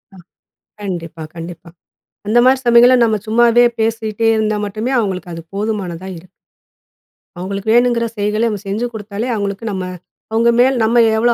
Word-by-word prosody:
அ, - - -14 0.6
கண்டிப்பா, 170 -4 -5
கண்டிப்பா. 170 0 -9 0.6
அந்த 220 +3 +3
மாரி 260 0 +5
சமயங்கள்ல, 240 +2 +6
நம்ம 220 -2 +1
சும்மாவே 240 +1 +4 0.2
பேசிட்டே 225 0 0
இருந்தா 215 -1 0
மட்டுமே, 215 +6 -3
அவங்களுக்கு 185 -5 -3
அது 165 - -8
போதுமானதா 195 -4 -3
இருக்கும். 180 +2 -17 1.1
அவங்களுக்கு 195 +3 -4
வேணுங்கிற 240 -1 +3
செயல்களை 210 +2 0
நம்ம 205 -2 -4
செஞ்சு 210 +5 -2
கொடுத்தாலே, 210 +2 -5
அவங்களுக்கு 200 +1 -4
நம்ம 190 -1 -3 0.5
அவங்க 230 +1 +3
மேல 260 +2 +5
நம்ம 230 +2 +2 0.2
எவ்ளோ 235 +1 +3
215 Hz, 145 wpm, -17 LUFS, 195-235 Hz, 1.1 s, சமயங்கள்ல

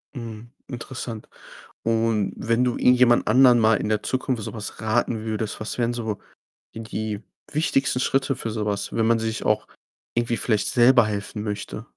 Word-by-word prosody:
Mhm, 115 -1 -8 0.2
interessant. 120 -3 -7 0.5
Und 115 -3 +1
wenn 115 +2 +1
du 125 -1 0
irgendjemand 125 -1 +4
anderen 125 +1 +6
mal 110 0 +4
in - - -3
der 105 -1 0
Zukunft 130 -2 -1
so - - -5
was 105 -2 -7
raten 110 0 0
würdest, 110 -1 -3
was 110 - -5
wären 120 0 +1
so 110 -4 -3 0.6
die 115 - -7
die 110 -1 -4 0.3
wichtigsten 135 -4 +1
Schritte 135 +1 +1
für 115 - -4
so 110 -1 -3
was, 100 -1 -2
wenn 115 - +1
man 115 0 +3
sich 110 0 -3
auch - - +1 0.5
irgendwie 120 0 0
vielleicht 105 -4 0
selber 120 -1 +5
helfen 105 0 -4
möchte? 105 -2 -4
115 Hz, 170 wpm, -24 LUFS, 110-120 Hz, 0.6 s, anderen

